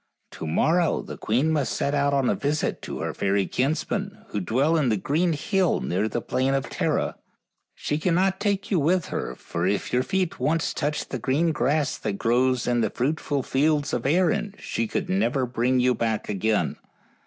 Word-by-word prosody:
To - - -6
morrow 160 - +2
the - - -7
queen 130 +9 +1
must 150 -4 0
set 140 - -1
out 140 0 +2
on 135 -2 +2
a - - +3
visit 150 +2 -1
to - - -6
her - - -2
fairy 100 0 +1
kins 140 - 0
men, 205 +1 -4
who 105 - -2
dwell 130 - +1
in 150 -6 +2
the 110 - +2
green 160 - +1
hill 190 +4 +1
near 100 +5 -1
the 120 - -3
plain 135 +1 +1
of 135 - -2
Tara; - - -1 0.6
she 150 - -2
cannot 185 +3 +1
take 200 -1 -1
you 185 - +3
with 175 +4 +1
her, 60 - -3
for 85 +6 -3
if 100 +1 -1
your 125 - +3
feet 185 +4 -1
once 165 +2 0
touched 150 0 -2
the 130 - -2
green 150 +8 +1
grass 145 +1 0
that 105 - -2
grows 125 +4 +1
in 120 -1 +1
the - - +1
fruitful 140 +1 -1
fields 145 +2 +1
of 120 +1 -1
Erin, 185 +5 +1
she 115 - -2
could - - -2
never 115 +8 +1
bring 125 +1 +1
you 125 0 +3
back 115 -2 -1
again. 105 +2 0
140 Hz, 195 wpm, -25 LUFS, 120-160 Hz, 0.6 s, a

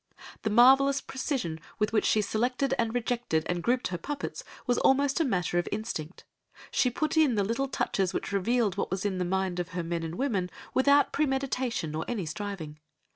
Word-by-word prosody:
The 220 - -1
marvellous 270 +5 +6
precision 260 - -3 0.2
with 210 0 0
which 220 - +2
she 215 - +3
selected 245 +6 0
and 230 -1 +1
rejected 240 -9 0
and 175 -1 -1
grouped 245 +3 +1
her 175 -2 -4
puppets 290 - -5 0.2
was 245 -1 +2
almost 275 +3 +3
a - - +4
matter 180 - 0
of 175 - -2
instinct. 190 -6 -5 0.5
She 250 - +3
put 310 +5 -1
in 295 -7 +4
the 205 - +2
little 235 +7 -1
touches 195 -8 0
which - - -3
revealed 205 +1 +1
what - - -1
was 190 +2 -3
in 190 -2 -1
the - - +1
mind 190 0 -1
of 175 -1 -4
her 175 - -1
men 170 0 -2
and 165 0 -5
women 205 -9 -1 0.2
without 280 +2 +4
premeditation 265 - -1
or 160 +1 -2
any 220 -7 -2
striving. 160 -3 -6
220 Hz, 190 wpm, -28 LUFS, 180-265 Hz, 0.5 s, marvellous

